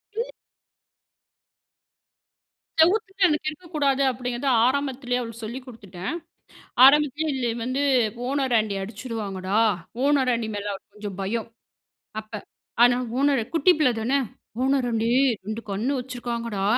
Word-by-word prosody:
இல் - - -3 2.5
செவுத்துட்ட 390 +3 +2
இருந்து 310 -3 +4
கிறுக்கக்கூடாது 305 -4 -1
அப்டீங்கிறத, 250 +2 -4 0.2
ஆரம்பத்திலயே 260 -2 -1
அவளுக்கு 230 0 -7
சொல்லிக் 250 +4 -7
குடுத்துட்டேன். 200 -6 -7 0.7
ஆரம்பத்திலயே 295 +2 +5
இது 240 -2 0
வந்து, 255 +3 -1 0.5
"ஓனர் 270 -3 0
ஆண்டி 215 -2 -1
அடிச்சுடுவாங்கடா". 205 -2 -3 0.5
ஓனராண்டி 255 -6 +2
மேல 205 0 -4 0.3
கொஞ்சம் 205 -2 -7
பயம் 225 +4 -2 0.7
அப்ப. 215 +1 -20 0.5
ஆனா 245 0 +6 0.2
ஓனரு 275 -4 +3
குட்டி 330 +3 +5
பிள்ள 295 -5 +4
தானே. 260 +5 +1 0.4
"ஓனராண்டி 245 -4 +1 0.4
2 215 +3 -4
கண்ணு 220 +8 -1
வச்சுருக்காங்கடா. 235 -5 -4
250 Hz, 105 wpm, -24 LUFS, 220-280 Hz, 2.5 s, ஆனா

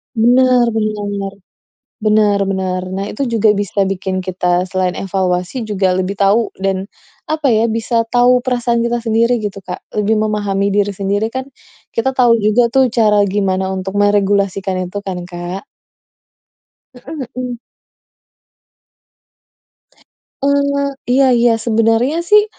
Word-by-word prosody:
Benar 245 +1 +4
benar. 205 -2 -2 0.7
Benar 210 -1 +3
benar. 185 -1 -2
Nah, 195 +1 -3
itu 215 - -6
juga 220 -2 +3
bisa 200 -1 -1
bikin 190 0 -2
kita, 180 -1 0
selain 185 -1 -2
evaluasi 185 +3 -2
juga 200 -4 0
lebih 185 +2 -2
tahu 205 +3 +2
dan 195 0 -2 0.4
apa 305 -5 +1
ya, 225 +1 +2
bisa 230 +1 0
tahu 245 +1 +4
perasaan 240 -2 0
kita 235 +1 0
sendiri 230 +2 +2
gitu, 205 -3 -5
Kak, - - -8
lebih 210 +1 +1
memahami 205 -2 0
diri 205 0 +2
sendiri 200 +2 -1
kan, 260 +2 -4 0.5
kita 265 +3 -1
tahu 245 -2 +5
juga 215 +4 +3
tuh 265 -2 +4
cara 215 -3 +3
gimana 190 -1 0
untuk 190 0 -4
meregulasikan 195 -2 +1
itu 205 - -6
kan, 185 -2 -4
Kak. 175 +2 -6 1.3
Heeh 270 +5 -10 0.2
heeh. 250 -1 -4 2.9
Eee, 280 0 +1 0.3
iya 265 +2 +4
iya. 240 -1 +4
Sebenarnya 230 +6 +1
sih 415 +5 +4
210 Hz, 130 wpm, -16 LUFS, 195-240 Hz, 2.9 s, tahu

